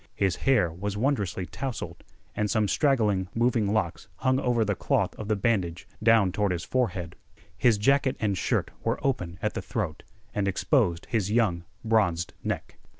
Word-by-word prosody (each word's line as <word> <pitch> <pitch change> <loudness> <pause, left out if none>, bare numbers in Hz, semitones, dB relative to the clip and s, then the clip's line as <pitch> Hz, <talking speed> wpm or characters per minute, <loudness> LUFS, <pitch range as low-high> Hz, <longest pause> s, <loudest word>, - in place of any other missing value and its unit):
His 95 -3 +1
hair 105 -11 +4
was 100 +4 -4
wondrously 105 -7 0
tousled, 130 +5 -5 0.3
and 105 0 0
some 110 -1 +2
straggling, 105 -7 +2
moving 115 -3 +2
locks 95 -6 -1
hung 130 +5 +1
over 120 -4 +1
the 105 - +1
cloth - - 0
of 110 - -7
the 110 - +2
bandage 95 -5 0
down 110 -4 +5
toward 100 +1 0
his 85 -1 -2
forehead. 95 -10 -1 0.4
His 120 -4 +3
jacket 135 +5 +2
and 100 -3 +1
shirt - - 0
were - - 0
open 90 -11 -1
at 105 - 0
the - - -3
throat, 95 - -3 0.3
and 100 -1 0
exposed 95 - +1
his 105 -4 +1
young 100 -7 +1 0.2
bronzed 100 -7 +2
neck. - - -4
105 Hz, 165 wpm, -27 LUFS, 95-115 Hz, 0.4 s, down